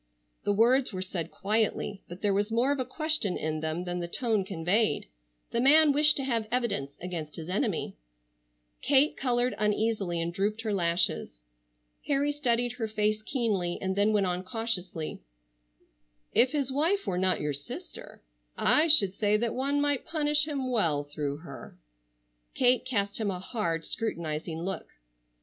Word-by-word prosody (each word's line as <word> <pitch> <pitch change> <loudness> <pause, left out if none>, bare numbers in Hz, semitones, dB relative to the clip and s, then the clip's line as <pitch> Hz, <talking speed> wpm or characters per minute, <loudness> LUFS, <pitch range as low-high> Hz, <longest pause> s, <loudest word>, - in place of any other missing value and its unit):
The - - +2
words 240 +5 +3
were 185 -2 -4
said 170 -3 -4
quietly, 210 -1 -1
but 175 +4 -11
there 205 -1 +2
was 205 +2 0
more 240 +5 +2
of 285 - -1
a 255 - -1
question 310 - 0
in 155 0 -3
them 160 +2 -3
than 180 0 -4
the 170 - -4
tone 220 +1 0
conveyed. 195 +4 0 0.5
The 235 - 0
man 300 +3 +6
wished 300 +1 +4
to 275 - +1
have 230 -4 -1
evidence 220 - -2
against 170 -4 -6
his 165 +1 -8
enemy. 205 - -2 0.8
Kate 285 +2 +3
colored 245 -1 0
uneasily 210 -4 0
and 165 +1 -2
drooped 210 +4 -1
her 220 -2 -2
lashes. 170 - 0 0.7
Harry 285 0 +1
studied 245 -4 0
her 225 -3 -2
face 215 0 -1
keenly, 215 -8 -1
and 190 0 -2
then 205 +2 +2
went 205 -2 +2
on 180 0 -2
cautiously: 185 -6 -3 1.1
"If 255 - +4
his 280 -3 0
wife 335 +9 +1
were 180 - -1
not 185 0 +3
your 150 -1 -2
sister 140 - -8 0.3
I 310 +2 +5
should 205 - +8
say 210 +1 +1
that 230 +1 -1
one 280 +2 0
might 290 -2 +1
punish 300 -1 +1
him 270 -4 -3
well 165 -11 +2
through 145 -1 -4
her." 140 - -11 0.8
Kate 250 0 +3
cast 200 -5 -1
him 215 -2 -1
a 185 - -3
hard, 180 -4 -3
scrutinizing 165 -6 -4
look. 190 -2 -4
210 Hz, 165 wpm, -28 LUFS, 180-255 Hz, 1.1 s, should